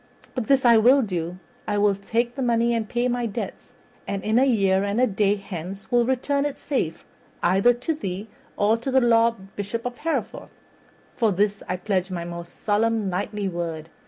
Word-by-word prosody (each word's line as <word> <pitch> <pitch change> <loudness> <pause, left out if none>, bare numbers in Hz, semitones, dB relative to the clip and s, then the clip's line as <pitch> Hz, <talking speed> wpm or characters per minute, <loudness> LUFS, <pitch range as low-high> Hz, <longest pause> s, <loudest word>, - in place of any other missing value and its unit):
But 250 -4 -3
this 275 -2 +3
I 235 -1 +7
will 255 +5 +5
do: 180 -3 -3 0.3
I 205 -1 0
will 205 0 +4
take 230 +5 -1
the 270 - -5
money 235 -1 +2
and 225 -2 -2
pay 240 +1 0
my 245 -1 -1
debts, 205 - -6 0.3
and 200 -1 -3
in 220 +3 +3
a 265 - +5
year 195 -6 +3
and 200 +3 -1
a 255 - +5
day 205 -2 +1
hence 195 -1 -8
will 240 -1 +3
return 280 +2 +1
it 290 -1 -3
safe 255 - -2 0.4
either 195 +7 +5
to 250 +7 -2
thee 200 -7 -5 0.3
or 210 +2 +3
to 235 +4 -4
the 265 0 +4
Lord 230 -5 +2
Bishop 205 +4 -4
of 245 0 -4
Hereford. 330 +1 -3 0.7
For 225 -3 +2
this 205 +2 0
I 180 - 0
pledge 185 0 -1
my 175 -2 -4
most 170 0 -9
solemn 215 -1 +1
knightly 200 +3 -2
word. 165 -3 -4
215 Hz, 190 wpm, -24 LUFS, 195-240 Hz, 0.7 s, I